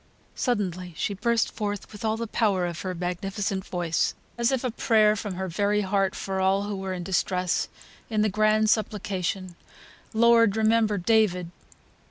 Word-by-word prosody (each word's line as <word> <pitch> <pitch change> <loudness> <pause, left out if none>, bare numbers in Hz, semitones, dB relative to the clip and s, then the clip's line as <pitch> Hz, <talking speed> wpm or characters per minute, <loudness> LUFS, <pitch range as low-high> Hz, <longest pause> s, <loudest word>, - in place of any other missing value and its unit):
Suddenly 185 - -2
she 205 - -1
burst 230 +3 +1
forth 205 -2 -4
with 210 0 -10
all 220 0 0
the 230 - -3
power 205 -5 +1
of 175 -1 -4
her 185 -1 -3
magnificent 190 +2 -3
voice, 175 -2 0 0.2
as 235 +2 +1
if 265 -2 0
a 250 - -1
prayer 215 -2 +3
from 205 -3 -5
her 190 +1 -3
very 205 +4 +1
heart 195 -1 0
for 190 -1 -3
all 190 +1 +2
who 205 0 -3
were 190 0 -4
in 175 - -5
distress, 180 0 0 0.4
in 215 -2 +1
the - - +3
grand 215 +1 +3
supplication, 195 -4 -2 0.6
"Lord, 230 -2 +4
remember 220 -1 +3
David." 180 -3 +2
205 Hz, 165 wpm, -26 LUFS, 185-220 Hz, 0.6 s, Lord